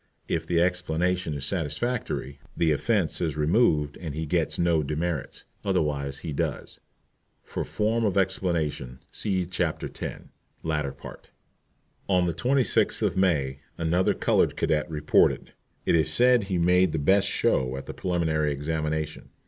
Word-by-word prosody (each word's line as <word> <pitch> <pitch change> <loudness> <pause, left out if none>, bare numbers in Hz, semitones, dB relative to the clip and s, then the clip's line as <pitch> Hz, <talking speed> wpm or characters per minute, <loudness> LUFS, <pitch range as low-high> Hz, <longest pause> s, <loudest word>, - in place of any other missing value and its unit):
If - - -2
the 85 -1 +2
explanation 90 -1 0
is 70 -1 -3
satisfactory, 80 - -2 0.2
the 80 -2 +3
offence 95 +3 0
is 80 -4 -1
removed 75 -3 +2
and 80 -5 -5
he 80 +1 -3
gets 75 - 0
no 85 -2 +2
demerits, 75 +1 -3 0.2
otherwise 70 -2 -1
he 80 - -3
does. - - -3 0.6
For - - -4
form 110 +2 0
of 100 -2 +1
explanation 85 -9 -1
see 95 -3 -1
Chapter 85 -2 -2
X., - - -6 0.4
latter 75 -3 -1
part. 70 +2 -12 0.8
On 90 -2 +3
the 85 - 0
26th 125 - +2
of - - +1
May, 75 -8 +1 0.2
another 85 +3 +1
colored - - +2
candidate 75 +1 0
reported. 75 -1 +2 0.3
It - - +2
is 80 -2 +3
said 125 -3 +5
he 95 -2 -1
made 90 0 +3
the - - 0
best 95 +7 +3
show 65 -8 +1
at 65 - -7
the - - -7
preliminary 80 -4 0
examination. 75 +1 -3
80 Hz, 145 wpm, -26 LUFS, 75-90 Hz, 0.8 s, said